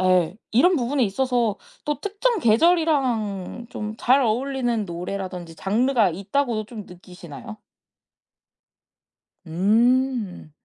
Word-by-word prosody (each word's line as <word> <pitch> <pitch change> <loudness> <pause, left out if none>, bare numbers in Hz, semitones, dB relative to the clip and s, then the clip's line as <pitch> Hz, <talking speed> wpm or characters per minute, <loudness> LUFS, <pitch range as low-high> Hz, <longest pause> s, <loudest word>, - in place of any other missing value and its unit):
예 185 -1 +2
이런 350 +11 +4
부분에 260 -1 +1
있어서 235 0 0 0.3
또 295 0 -2
특정 425 +2 0
계절이랑 240 - +1
좀 210 0 -5
잘 260 +4 +3
어울리는 245 -1 0
노래라든지 180 -1 -6
장르가 220 - +2
있다고도 215 - -1
좀 215 -2 -9
느끼시나요? 180 +3 -11 1.9
음. 220 +1 +1
225 Hz, 230 characters per minute, -23 LUFS, 190-265 Hz, 1.9 s, 이런